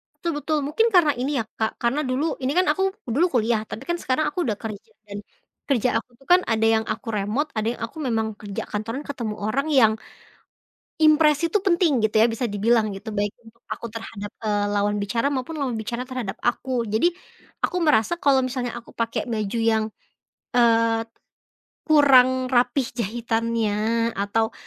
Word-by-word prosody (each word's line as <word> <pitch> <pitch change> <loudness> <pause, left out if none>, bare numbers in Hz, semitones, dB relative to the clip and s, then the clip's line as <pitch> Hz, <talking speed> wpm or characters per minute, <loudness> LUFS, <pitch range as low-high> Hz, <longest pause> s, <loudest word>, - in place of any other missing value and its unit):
Betul 340 - -6
betul. 310 0 0
Mungkin 445 +11 +2
karena 325 -4 +6
ini 270 +3 -1
ya, 225 - -2
Kak, 220 0 -1
karena 240 +5 +1
dulu 280 +6 0
ini 260 - +1
kan 365 - +4
aku 385 - -1 0.2
dulu 270 +9 +2
kuliah, 230 -2 +2
tapi 225 - -7
kan 345 - +2
sekarang 285 +4 0
aku 330 - -6
udah 215 -5 -1
kerja, 215 -3 -8 0.2
dan 200 0 -6 0.5
kerja 250 -2 +2
aku 250 - -15
tuh 270 - -22
kan, 360 +1 +7
ada 225 -1 +1
yang 220 0 +3
aku 220 +2 -4
remot, 210 +9 -1
ada 215 +1 0
yang - - -14
aku 230 - -14
memang 225 -5 0
kerja 210 +1 -5
kantoran 225 +7 -4
ketemu 235 -7 -4
orang 230 +8 -1
yang, 235 -7 +5 1.1
impresi 310 0 +4
tuh 380 +4 0
penting 340 - +2
gitu, 220 0 0
ya, 225 - +6
bisa 230 +1 -3
dibilang, 215 +1 +2
gitu. 195 +4 -11
Baik 205 0 0
untuk 230 +1 -19
aku 235 - -4
terhadap, 220 -2 -7
eee, 205 -1 +1
lawan 205 0 +1
bicara, 230 +5 0
maupun 270 +4 -3
lawan 275 -5 -2
bicara 235 +3 -4
terhadap 255 -6 -5
aku. 245 0 0
Jadi, 220 +8 +2 0.6
aku 360 - 0
merasa, 300 -5 +3
kalau 270 -4 +3
misalnya 250 -1 -3
aku 235 -1 -10
pakai 230 0 -2
baju 215 -1 -2
yang, 220 -1 +1 0.7
eee, 230 -2 +3 0.9
kurang 260 -4 +5
rapi 250 +2 +3
jahitannya, 230 0 0
atau 220 +3 -1
235 Hz, 175 wpm, -23 LUFS, 220-275 Hz, 1.1 s, kan